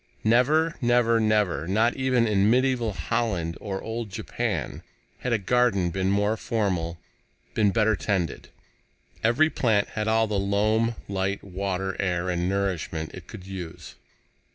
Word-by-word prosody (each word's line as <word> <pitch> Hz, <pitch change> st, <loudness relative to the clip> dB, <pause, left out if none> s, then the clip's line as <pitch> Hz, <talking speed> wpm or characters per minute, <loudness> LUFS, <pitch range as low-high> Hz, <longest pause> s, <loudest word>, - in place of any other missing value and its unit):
Never, 145 Hz, +9 st, +3 dB
never, 120 Hz, -1 st, +3 dB
never 105 Hz, -8 st, +1 dB
not 110 Hz, +5 st, +2 dB
even 130 Hz, -3 st, +2 dB
in 100 Hz, -1 st, +3 dB
medieval 125 Hz, -2 st, +2 dB
Holland 90 Hz, -5 st, -1 dB
nor 95 Hz, -2 st, -4 dB
old 115 Hz, 0 st, -4 dB
Japan 105 Hz, +2 st, -3 dB, 0.4 s
had 125 Hz, -, -3 dB
a 115 Hz, -, +3 dB
garden 100 Hz, -4 st, +2 dB
been 95 Hz, +1 st, 0 dB
more 105 Hz, +2 st, +2 dB
formal, 95 Hz, -7 st, -1 dB, 0.6 s
been 105 Hz, -2 st, +3 dB
better 110 Hz, +1 st, +2 dB
tended. 95 Hz, -6 st, -2 dB, 0.7 s
Every 130 Hz, +8 st, +3 dB
plant 110 Hz, -5 st, +1 dB
had 110 Hz, -1 st, -3 dB
all 110 Hz, 0 st, +3 dB
the 105 Hz, -2 st, -1 dB
loam, 110 Hz, +4 st, +1 dB
light, 100 Hz, 0 st, -2 dB
water, 95 Hz, 0 st, -3 dB
air 90 Hz, -1 st, 0 dB
and 90 Hz, +1 st, -1 dB
nourishment 90 Hz, -5 st, -2 dB
it -, -, -10 dB
could 95 Hz, -, -10 dB
use. 95 Hz, -4 st, -8 dB
105 Hz, 140 wpm, -26 LUFS, 95-115 Hz, 0.7 s, Never